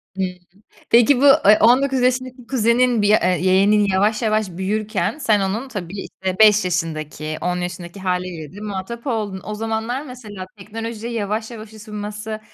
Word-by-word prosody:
Hımm. 190 - 0 0.6
Peki, 245 +3 +5
bu, - - +4 0.2
eee, 210 +1 +7
19 260 +3 +4
yaşındaki 255 -1 -1
kuzenin 240 -1 +2
bir, 205 - +2
eee, 185 -4 +3
yeğenin 195 +3 +4
yavaş 205 +4 +1
yavaş 215 -3 +1
büyürken 205 - -2
sen 215 -8 +2
onun 205 +7 -2
tabii, 195 -4 -6
işte, 190 +1 -5
5 210 -2 +6
yaşındaki, 155 -3 -3
10 180 +1 -1
yaşındaki 175 +1 -6
hâliyle 180 -4 -3
de 205 - -9
muhatap 210 +4 -6
oldun. 210 -6 -2
O 210 - -4
zamanlar 225 +5 -3
mesela 215 -7 -9
teknolojiye 225 +3 -6
yavaş 220 +1 -3
yavaş 220 -1 -10
ısınması, 210 0 -6
210 Hz, 155 wpm, -20 LUFS, 190-230 Hz, 0.6 s, eee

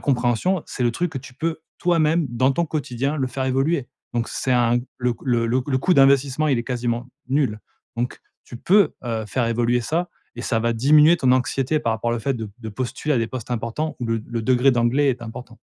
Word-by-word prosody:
compréhension, 130 +7 +1
c'est 125 - -4
le 120 - +3
truc 170 +4 -2
que 135 - -3
tu 130 -1 -13
peux 160 +2 -3 0.2
toi-même, 165 -2 +2
dans 130 +3 +2
ton 170 +3 0
quotidien, 140 -1 -2
le 130 -2 0
faire 130 +2 -3
évoluer. 135 +1 0 0.3
Donc 115 -1 -1
c'est 130 - -1
un 120 0 +3 0.2
le 125 -1 0
coû - - -18
le 120 -2 +2
le 125 +3 +1
c 125 - -2
le 130 -1 +1
coût 180 +7 +2
d'investissement, 140 +1 +4
il 130 -4 +2
est - - -1
quasiment 120 -1 -2 0.2
nul. 130 -6 0 0.4
Donc, 120 +1 -3 0.2
tu 120 - -10
peux, 200 +6 +3
heu, 115 -2 -2
faire 120 +2 -1
évoluer 120 +1 +1
ça 170 +7 -1 0.3
et 120 - -5
ça 115 - 0
va 115 0 +1
diminuer 150 +7 +6
ton 130 -5 +3
anxiété 135 +3 +1
par 115 - 0
rapport 115 +1 -2
à - - +1
le - - -2
fait 135 +4 -1
de 110 -3 -6
de 110 -2 -7
postuler 130 +6 -2
à - - +2
des 115 - 0
postes 125 -2 -7
importants 120 +6 -3
ou 120 - -2
le 115 -1 -1
le 115 -1 -3
degré 130 +3 +4
d'anglais 125 +4 +2
est 120 -1 -4
important. 115 +1 -9
125 Hz, 235 wpm, -22 LUFS, 120-145 Hz, 0.4 s, diminuer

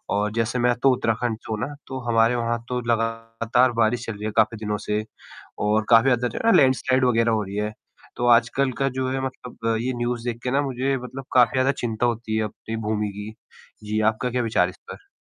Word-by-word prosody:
और 105 +1 0
जैसे 115 +2 -1
मैं 120 0 +3
तो 135 - +6
उत्तराखंड 115 -1 -1
से - - -9
हूँ 110 - -2
ना, 145 - -3
तो 130 -1 -5
हमारे 115 +1 +3
वहाँ 120 0 -1
तो 125 0 -1
लगातार 115 +2 +1
बारिश 115 +2 +1
चल 115 - -4
रही 105 +1 -7
है 110 - -2
काफ़ी 110 +1 +3
दिनों 105 0 -1
से 105 +1 0 0.6
और 110 +1 +2
काफ़ी 115 +3 +6
ज़्यादा 125 - 0
लैंडस्लाइड 130 -1 +3
वगैरह 115 -2 +3
हो 110 -1 +1
रही 100 0 -7
है। 105 0 -1 0.5
तो 120 - -1
आजकल 120 +3 +3
का 135 0 +2
जो 130 0 -2
है 135 0 -1
मतलब 120 -3 -4
ये 130 +1 -1
न्यूज़ 120 -1 -2
देख 120 -1 -3
के 125 - -1
ना 140 +2 +2
मुझे 135 0 -1
मतलब 130 +1 -8
काफ़ी 125 -3 +5
ज़्यादा 130 +1 +3
चिंता 115 0 0
होती 115 -2 -1
है 110 - +1
अपनी 110 +1 -7
भूमि 105 -1 0
की, 105 +2 -8 0.5
जी, 105 +1 -1
आपका 110 +3 +1
क्या 125 - 0
विचार 110 -6 +2
है - - -6
इस - - -20
पर? - - -12
115 Hz, 220 wpm, -23 LUFS, 110-125 Hz, 0.6 s, तो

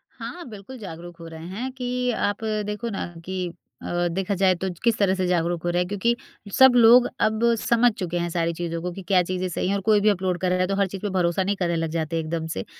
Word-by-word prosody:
हाँ, 350 -3 -7
बिल्कुल 210 +5 -10
जागरूक 175 -3 -9
हो 165 - -9
रहे 160 0 -9
हैं 240 +8 -4
कि 250 0 -1
अ, - - -3
आप 205 +2 -1 0.2
देखो 210 +3 -3
ना 200 - -3 0.2
कि 185 -1 -3 0.4
अ, 175 0 0
देखा 195 +3 -1
जाए 185 -1 +3
तो 190 +2 -3
किस 230 -1 +3
तरह 195 -2 +3
से 185 -1 -1
जागरूक 175 -1 0
हो 175 - 0
रहे 175 +1 +1
हैं, 180 - -1
क्योंकि 205 +4 +1 0.4
सब 265 -1 +7
लोग 240 +1 +7
अब 215 0 +2 0.2
समझ 235 0 +3
चुके 175 -1 -2
हैं 170 0 -1
सारी 170 0 0
चीज़ों 170 0 -4
को 180 0 -3
कि 195 - -8
क्या 185 -3 +4
चीज़ें 185 +1 -2
सही 175 - -2
हैं 200 - +1
और 200 - -2
कोई 210 +1 +4
भी 215 - +4
अपलोड 185 -2 0
कर 185 - +1
रहा 180 0 +1
है, 185 - +2
तो 195 - -1
हर 200 -1 +2
चीज़ 190 0 -7
पे 205 - -2
भरोसा 175 +1 +2
नहीं 200 +2 0
करने 175 -3 -1
लग 165 -1 -1
जाते 160 +1 -2
हैं 165 - 0
एकदम 160 0 -3
से। 95 - -4
185 Hz, 265 wpm, -24 LUFS, 175-210 Hz, 0.4 s, सब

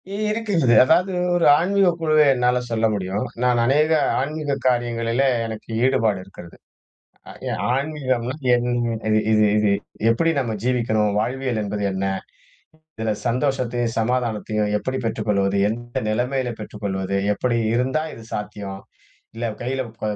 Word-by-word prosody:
இ - - -3 0.2
இருக்குது, 200 - +2
அதாவது 180 +8 +3 0.2
ஒரு 175 -1 +2
ஆன்மீகக் 185 0 +2
குழுவ 155 -1 +2 0.2
என்னால 125 0 +2
சொல்ல 115 -1 +1
முடியும். 100 +3 -2 0.2
நான் 125 -1 +3
அநேக 150 +5 +3 0.3
ஆன்மீக 145 +1 -2
காரியங்களிலே 120 +1 +1 0.2
எனக்கு 110 -1 -8 0.2
ஈடுபாடு 115 -7 +2
இருக்குறது. 95 -3 -13 0.7
ஆ, - - -8 0.4
ஆன்மீகம்னா 130 -3 -2 0.2
என்ன 120 -1 0
இது 110 0 +4
இது 105 0 +4
இது 105 -1 +3 0.4
எப்டி 165 +9 +2
நம்ம 120 -4 -2
ஜீவிக்கணும், 115 -4 +1
வாழ்வியல் 125 0 -1
என்பது 105 0 -3
என்ன? 95 +1 -2 0.9
இதுல 110 -1 -1
சந்தோஷத்தையும், 120 -2 0
சமாதானத்தையும் 110 -3 -1
எப்டி 130 +4 -3
பெற்றுக் 110 -1 -3
கொள்வது, 100 -1 +1
எந்த 120 +2 -4
நெலமையில 125 +3 -1
பெற்றுக் 105 0 -9
கொள்வது, 95 0 -2 0.2
எப்டி 120 +3 0 0.2
இருந்தா 130 +5 +1
இது 115 - -12
சாத்தியம், 100 -2 -5 0.6
இல்ல 120 - -4 0.2
கையில 130 +2 -1 0.2
ப - - -26
120 Hz, 135 wpm, -22 LUFS, 110-130 Hz, 0.9 s, இது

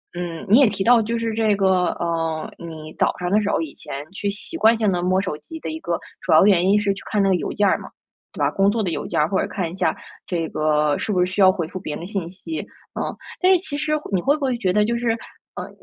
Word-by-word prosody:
嗯， 175 -1 -5
你 220 +6 +7
也 275 - +7
提 195 -2 -2
到 240 +3 +6
就 230 +1 -1
是 230 -1 -1
这 220 -2 +2
个， 190 -2 +2
呃， 165 -2 -2
你 160 -2 -9
早 - - +2
上 175 0 -2
的 205 +3 +4
时 - - -2
候 - - +1
以 160 -3 -6
前 140 +1 -7
去 200 +1 -4
习 210 +11 -6
惯 225 -5 +5
性 220 -3 +1
地 175 -1 -1
摸 185 +1 +2
手 185 -6 -3
机 320 - -10
的 - - -5
一 320 - -5
个 - - -2 0.2
主 - - -3
要 - - +7
原 185 -3 +4
因 205 +2 +4
是 205 - +1
去 195 - -10
看 210 - 0
那 195 - +3
个 190 - +4
邮 180 - -3
件 205 -1 +2
儿 - - +3
嘛， - - -10 0.4
对 - - -11
吧？ - - +3
工 195 +1 +2
作 225 +1 0
的 190 - -1
邮 165 - -3
件 - - -1
儿 150 - +2
或 190 - +1
者 - - 0
看 180 -5 -3
一 - - -8
下 - - +1 0.3
这 170 -3 -2
个， 150 -1 +1
是 - - -3
不 180 -3 +3
是 180 - -2
需 200 - 0
要 190 -1 +8
回 175 -4 -3
复 185 +3 -7
别 155 -5 -5
人 - - -5
的 - - -6
信 195 -4 -3
息？ 315 - -6 0.4
嗯。 - - -1 0.3
但 370 +1 +4
是 375 - +6
其 300 -5 -5
实 300 +1 -2 0.2
你 190 - +2
会 280 +11 +2
不 305 - -9
会 255 -3 0
觉 190 -6 0
得 210 +1 +4
就 235 +2 0
是， 235 0 -1 0.5
呃， - - -6
195 Hz, 315 characters per minute, -22 LUFS, 175-220 Hz, 0.5 s, 要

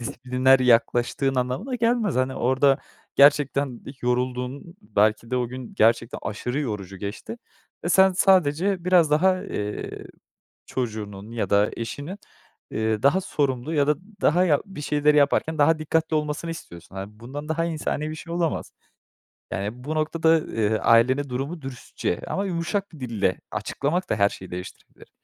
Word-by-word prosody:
disipliner 125 +3 +2
yaklaştığın 125 +2 +2
anlamına 130 - -2
gelmez. 230 - +1
Hani, 130 +1 +1
orada 130 +2 +3 0.4
gerçekten 140 -2 +4 0.2
yorulduğun 125 +6 -2
belki 105 +2 +1
de 125 - 0
o 125 -1 0
gün 130 -1 -8
gerçekten 115 +1 +2
aşırı 125 +6 -3
yorucu 100 -7 -4
geçti 105 - -6 0.5
ve - - 0
sen 190 +2 +5
sadece 180 0 +3
biraz 175 -4 +4
daha, 185 +5 +3
eee, 105 - -5 0.6
çocuğunun 105 -4 -5
ya 115 - -2
da 100 +1 +3
eşinin, 145 - -5 0.5
eee, 110 0 -1
daha 150 +8 +4
sorumlu 140 -3 -1
ya 145 -1 +2
da 150 - +3 0.3
daha 180 +4 +4
ya 150 -5 +3
bir 190 -7 -9
şeyleri 150 0 +2
yaparken 145 +2 +2
daha 155 +2 +4
dikkatli 160 +1 0
olmasını 150 +2 -2
istiyorsun. 85 - -10
Hani, 100 +2 -8
bundan 145 +6 -7
daha 165 +1 0
insani 155 -2 -2
bir 155 - -5
şey 165 +1 -8
olamaz. 170 -2 -1 0.8
Yani, 105 +6 -4
bu 155 - -2
noktada, 160 +1 +3
eee, 110 -1 0
ailene 130 +6 +3
durumu 140 +6 -4
dürüstçe 125 -8 -4
ama 195 - -2
yumuşak 190 +2 -2
bir 155 - -12
dille 110 -7 -1
açıklamak 145 - -2
da - - +1
her 100 -1 +3
şeyi 95 - -10
değiştirebilir. 90 +1 -10
140 Hz, 150 wpm, -24 LUFS, 115-160 Hz, 0.8 s, sen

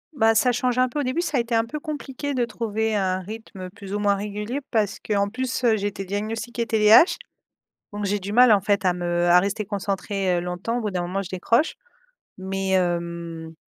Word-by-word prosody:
Bah 225 -3 +3
ça 250 +3 +4
change 245 0 0
un 255 0 +3
peu, 295 - -4
au - - 0
début 260 +6 0
ça 310 -6 -1
a - - +3
été 235 0 -1
un 225 0 +2
peu 300 +6 -6
compliqué 285 -1 -5
de 245 -2 +1
trouver 220 -1 -2
un 185 -2 0
rythme 195 -2 -9
plus 200 -1 -7
ou 210 - -1
moins 205 -1 +3
régulier 210 +5 -4
parce 210 -4 0
que 215 - -3
en 200 0 +2
plus, 255 +4 -3
heu, 230 -2 +4
j'étais 200 -1 -3
diagnostiquée 225 +4 -3
TDAH 220 - +6 0.8
donc 205 0 -3
j'ai 205 +1 0
du 200 +2 -6
mal, 250 +2 +6
en 205 -2 +6
fait, 200 -1 0
à 180 - +4
me 175 0 -1
à 175 +1 +7
rester 200 +3 -1
concentré, 195 -2 -1
heu, - - 0
longtemps 180 +7 -3
au - - -2
bout 210 - -2
d'un 185 -2 -2
moment 180 +3 -2
je 185 - -9
décroche 230 - +1 0.6
mais 190 0 -3
hem 170 -3 -2
205 Hz, 220 wpm, -24 LUFS, 190-230 Hz, 0.8 s, à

